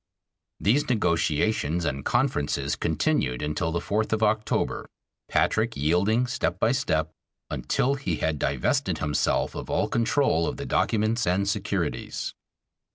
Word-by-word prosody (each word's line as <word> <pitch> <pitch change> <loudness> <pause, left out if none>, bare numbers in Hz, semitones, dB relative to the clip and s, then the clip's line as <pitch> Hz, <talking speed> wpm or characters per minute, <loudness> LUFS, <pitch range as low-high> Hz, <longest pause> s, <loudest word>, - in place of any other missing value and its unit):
These 125 +9 +2
negotiations 85 -4 +1
and 70 -2 -2
conferences 70 - 0
continued 60 +1 0
until 75 +3 -1
the 85 - 0
fourth 110 +4 -1
of 110 0 +1
October, 110 0 0 0.4
Patrick - - +1
yielding 95 - +2
step 125 -9 -2
by 110 - +3
step, 80 - 0 0.4
until 135 - 0
he 135 - -2
had 80 -1 -1
divested 70 -3 0
himself 75 -1 0
of - - -7
all - - +1
control 115 - +2
of - - -3
the - - -5
documents 110 +1 +1
and 95 +3 +1
securities. 100 -5 -2
100 Hz, 130 wpm, -26 LUFS, 80-110 Hz, 0.4 s, by